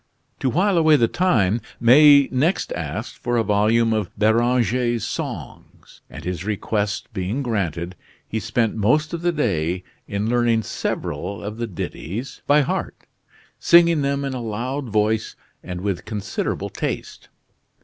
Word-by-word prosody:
To 130 - +1
while 180 - +2
away 160 -1 +5
the 120 -5 +3
time, 115 - +1 0.2
May 140 +3 +7
next 150 +9 0
asked - - -5
for 120 0 -1
a 115 - +2
volume 110 +2 +2
of 105 -4 -1
Beranger's 120 +2 +2
songs, - - -7
and - - -10
his 90 -1 -4
request 105 0 -2
being 105 +8 -2
granted, 90 - -2 0.3
he 110 - -2
spent 110 +1 0
most 140 +10 +1
of 170 - -3
the 175 0 +2
day 90 - -1 0.2
in 100 +2 -2
learning 120 -1 +2
several 100 - -4
of 105 +2 -5
the 120 0 -3
ditties 105 - -6
by 150 +1 +5
heart, 140 - -3 0.5
singing 170 -2 +5
them 140 0 -1
in 135 - -3
a 125 - -4
loud 120 +4 -3
voice 110 +1 0 0.3
and 90 -1 -6
with 100 -2 -2
considerable 105 -2 -3
taste. - - -5
115 Hz, 145 wpm, -22 LUFS, 105-135 Hz, 0.5 s, May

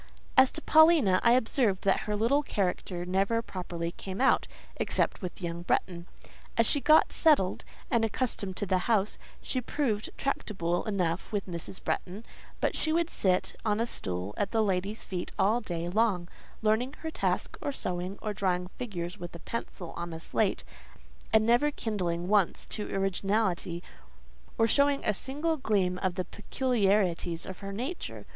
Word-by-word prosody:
As 260 0 +7
to 315 - -5
Paulina, 315 - +6
I 235 - +6
observed 230 -4 +2
that 195 - +3
her 210 - +1
little 235 +7 +3
character 180 -7 -2
never 195 +5 +1
properly 175 -4 -4
came 190 +2 -7
out, 265 - +3 0.3
except - - 0
with 180 0 -6
young 170 0 -3
Bretton. 175 0 -1 0.5
As 230 - +5
she 285 - +2
got 310 +2 +5
settled, 290 - +3 0.3
and 235 -3 +3
accustomed 215 -4 -1
to 205 - -1
the 185 -1 +2
house, 210 -3 +2 0.2
she 255 - -1
proved 235 -5 -1
tractable 175 -10 -1
enough 185 -4 -1
with 205 -2 -1
Mrs. 175 +1 -3
Bretton; 195 +5 -3 0.3
but - - 0
she 315 - 0
would 335 +1 +1
sit 185 -2 +1
on 210 -1 +1
a 230 - +2
stool 95 - -3
at 200 - 0
that 225 - +1
lady's 200 +1 -1
feet 180 -3 -4
all 220 +5 +3
day 170 -5 -3
long, 190 -2 +1 0.4
learning 225 +5 +2
her 320 - -3
task, - - -1
or 285 - -1
sewing, 180 -5 -4
or 215 - -1
drawing 180 -3 0
figures 180 -8 -4
with 175 0 -7
a - - -7
pencil 180 -3 -6
on 170 -1 -5
a 160 - -6
slate, - - 0 0.7
and 220 0 +5
never 240 +6 +4
kindling 180 -10 -2
once 200 -3 +2
to 210 - -4
originality, 195 -2 0 0.7
or 225 - +4
showing 280 +4 +2
a 210 - +3
single 295 +9 -2
gleam 190 -8 +1
of 185 -2 -1
the 185 - -2
peculiarities 200 -7 0
of 190 - -7
her 195 -1 -6
nature. 255 - -5
200 Hz, 165 wpm, -29 LUFS, 180-235 Hz, 0.7 s, As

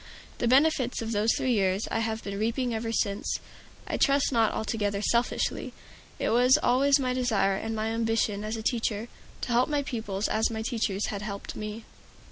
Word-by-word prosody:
The 240 - +1
benefits 260 -2 +3
of 225 - -4
those 215 +1 +1
three 255 - 0
years 195 -2 +1
I - - 0
have 225 0 -2
been 200 0 -4
reaping 235 +3 0
ever 225 0 -2
since, 200 -2 -1 0.5
I - - -2
trust 280 0 +3
not 225 -4 +3
altogether 205 -2 -1
selfishly. 235 +3 0 0.4
It - - -1
was 250 +3 +5
always 275 +3 +4
my 255 -2 0
desire 220 -6 +1
and 225 +3 -3
my 220 0 -1
ambition 225 -2 0
as 215 +1 -3
a 220 - -6
teacher, 225 -1 -1 0.3
to - - -3
help 245 +4 +3
my 290 -1 0
pupils 220 -6 -3
as 220 +1 +1
my 220 -1 -4
teachers 220 -4 -1
had 200 -2 -4
helped 200 -1 -6
me. 215 +1 -6
225 Hz, 185 wpm, -28 LUFS, 210-245 Hz, 0.5 s, was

